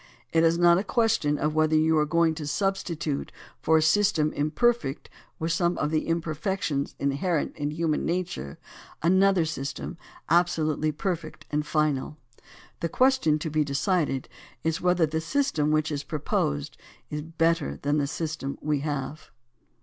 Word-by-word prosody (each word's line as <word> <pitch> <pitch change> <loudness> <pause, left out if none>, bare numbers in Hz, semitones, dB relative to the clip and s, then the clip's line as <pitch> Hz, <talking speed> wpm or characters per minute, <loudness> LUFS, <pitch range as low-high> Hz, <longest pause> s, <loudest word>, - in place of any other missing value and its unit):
It 165 0 +4
is 165 0 +4
not 175 0 +5
a - - -1
question 215 -9 +1
of 150 +1 0
whether 155 0 +2
you 160 +1 +3
are 150 - +1
going 165 +1 +3
to 155 -2 -6
sub 195 +6 +1
stitute 160 -6 -4 0.3
for 160 - +4
a 155 - +3
system 165 -4 +3
imperfect 155 - 0 0.3
with 160 +1 -2
some 175 +1 +1
of 150 - -1
the 155 -1 0
imper 165 -1 -1
fections 155 -5 -2
inherent 145 +4 -1
in 145 -1 -2
human 155 0 -1
nature 165 - -3 0.5
another 190 0 +4
system 150 +2 -5 0.3
absolutely 155 -3 +2
perfect 155 -2 -4
and 150 0 0
final. 150 -2 0 0.6
The 170 - -2
question 255 - +3
to 155 0 -4
be 155 0 +2
de 140 -1 -4
cided 150 -4 0 0.4
is 160 0 -1
whether 180 -2 +3
the 160 +1 -2
system 165 - 0
which 155 0 +1
is 145 -1 -2
proposed 140 - -2 0.3
is 150 0 -3
better 165 0 0
than 145 +1 +1
the 140 - 0
system 150 -2 -4
we 150 -1 0
have. 145 +1 -4
155 Hz, 160 wpm, -26 LUFS, 150-170 Hz, 0.6 s, not